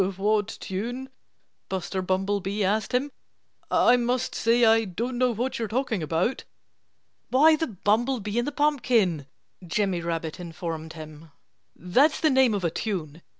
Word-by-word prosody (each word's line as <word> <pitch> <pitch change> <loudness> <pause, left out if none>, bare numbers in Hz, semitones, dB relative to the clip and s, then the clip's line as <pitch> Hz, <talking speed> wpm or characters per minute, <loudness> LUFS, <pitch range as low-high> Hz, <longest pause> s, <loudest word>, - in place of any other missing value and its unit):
"What 210 +1 +1
tune?" 235 +6 -5 0.6
Buster 190 0 -3
Bumblebee 195 +2 -1
asked 210 +3 0
him. 265 +3 0 0.6
"I 245 - +5
must 245 +1 -1
say 235 +1 +3
I 225 0 +5
don't 235 +6 -4
know 255 0 +3
what 240 +3 -3
you're 225 - -1
talking 230 -3 -1
about." 165 - -1 0.9
"Why, 310 +5 +6
The 320 +1 -2
Bumblebee 215 +2 0
in 240 - 0
the 290 - -2
Pumpkin!" 240 - +1 0.4
Jimmy 180 0 -1
Rabbit 165 -1 -4
informed 165 -2 -6
him. 155 0 -11 0.5
"That's 260 - +2
the 315 - +3
name 260 -4 +4
of 195 - -3
a 170 - +1
tune. 170 -6 -4
210 Hz, 145 wpm, -26 LUFS, 180-245 Hz, 0.9 s, Why